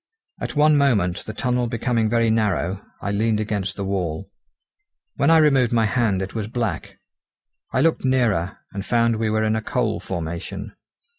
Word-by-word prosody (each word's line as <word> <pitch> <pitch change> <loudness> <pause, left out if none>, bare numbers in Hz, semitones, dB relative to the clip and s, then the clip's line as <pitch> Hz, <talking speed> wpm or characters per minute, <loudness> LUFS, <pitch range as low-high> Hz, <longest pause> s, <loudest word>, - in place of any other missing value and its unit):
At - - -4
one 150 0 +5
moment, 100 -10 +1
the 110 - -6
tunnel 125 -1 0
becoming 115 -1 0
very 115 0 +2
narrow, 100 -4 0 0.2
I 100 - -1
leaned 110 +1 +1
against 100 -2 -2
the 100 - -4
wall. 90 -5 -3 0.9
When 140 - +3
I 165 - +7
removed 135 -6 +4
my 115 -2 +3
hand 105 -4 +1
it 95 - -7
was 110 -3 -3
black. 115 -6 -3 0.7
I - - +1
looked 165 0 +2
nearer, 115 -9 +1 0.2
and 100 -1 -4
found 115 0 +2
we 110 0 0
were 110 0 +1
in 110 0 +1
a 110 - -1
coal - - -1
formation. 95 +4 -5
110 Hz, 170 wpm, -22 LUFS, 100-120 Hz, 0.9 s, I